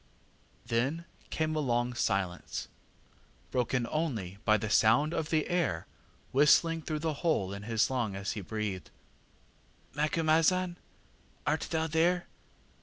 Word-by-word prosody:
ŌĆÖ 115 +1 +2
ŌĆ£Then 170 0 -10 0.2
came 155 0 -1
a - - +1
long 120 -3 0
silence, 95 -6 -2 0.8
broken 125 0 0
only 115 - -2
by 110 0 +5
the 110 - -3
sound 115 +9 +4
of 160 -2 -2
the 155 -2 +1
air 165 - 0 0.5
whistling 160 +4 +4
through 155 0 -3
the 155 +1 -1
hole 130 - +1
in 100 - -6
his 110 0 +1
lung 120 -6 -1
as 100 0 -3
he 105 - -4
breathed. 100 -5 -4 1.0
ŌĆ£ŌĆśMacumazahn, 165 +4 +2 0.7
art 155 +2 0
thou 160 -1 0
there? 170 +3 +2
135 Hz, 130 wpm, -31 LUFS, 110-160 Hz, 1.0 s, by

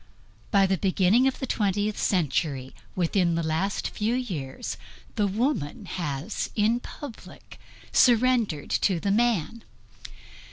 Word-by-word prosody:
By 200 -1 +4
the 190 -2 0
beginning 195 +6 +3
of 265 - -1
the 265 - -3
twentieth 205 -2 0
century, 145 -6 0 0.2
within 175 -1 +1
the 165 - -1
last 160 +6 -1
few 220 +3 -1
years, 165 - -4 0.4
the 210 -2 +1
woman 205 - -1
has 165 +1 -3
in 220 +3 +2
public 265 -1 -11 0.3
surrendered 235 - +3
to 185 -4 +2
the 200 +3 0
man. 230 -1 +1
200 Hz, 120 wpm, -26 LUFS, 170-230 Hz, 0.4 s, By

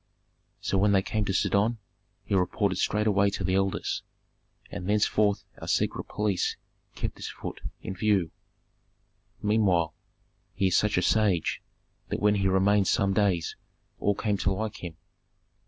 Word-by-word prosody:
"So 95 - 0
when 100 +1 +4
they 95 -1 +3
came 105 0 -1
to 100 - -1
Sidon 100 +4 +2 0.5
he - - -4
reported 95 +1 +1
straightway 105 -2 +2
to 100 - -4
the 95 +1 0
elders, 95 0 0 0.7
and 90 +2 -5
thenceforth 105 0 +2 0.2
our - - -7
secret - - 0
police 105 -4 -1 0.4
kept - - -4
this - - -6
Phut - - -7 0.2
in - - -4
view. 95 -4 +1 1.1
"Meanwhile 95 -7 +2 0.6
he 95 - +2
is 90 - +1
such 105 -2 +2
a 90 - +2
sage 100 -7 +2 0.5
that - - -2
when 105 0 +4
he 100 -1 0
had - - +4
remained 95 +1 +3
some 100 -1 +2
days 95 -5 +1 0.4
all 100 - +1
came 105 0 0
to 100 - 0
like 105 +1 -3
him. 85 -3 -8
100 Hz, 155 wpm, -27 LUFS, 95-105 Hz, 1.1 s, when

